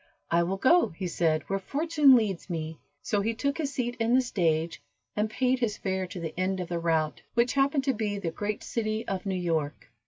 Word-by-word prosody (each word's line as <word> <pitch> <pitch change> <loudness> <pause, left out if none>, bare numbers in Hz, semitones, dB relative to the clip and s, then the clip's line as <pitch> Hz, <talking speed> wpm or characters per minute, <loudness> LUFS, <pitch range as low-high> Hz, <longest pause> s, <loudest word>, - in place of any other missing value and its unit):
"I 170 0 +4
will 185 +3 -1
go," 340 - +5
he 190 - -3
said, 160 -3 +1
"where 195 0 -1
fortune 295 - +4
leads 205 -6 0
me." 160 -2 -4 0.2
So 205 -4 0
he 225 +3 -1
took 280 +5 -1
his 290 -3 -1
seat 245 -2 -2
in 230 +2 +3
the 260 - +5
stage, 165 -8 0 0.3
and 210 +1 0
paid 255 +3 +1
his 220 -4 -1
fare 190 -1 -2
to 180 - -7
the 165 -2 -4
end 190 +1 0
of 180 - -4
the 170 -1 -1
route, 160 -2 0
which 235 +1 +3
happened 275 0 +2
to 270 -1 +1
be 210 -2 -2
the 175 -5 -3
great 205 +5 -3
city 220 -2 -2
of 195 0 -3
New 190 - 0
York. 160 -5 -2
205 Hz, 220 wpm, -28 LUFS, 170-245 Hz, 0.3 s, go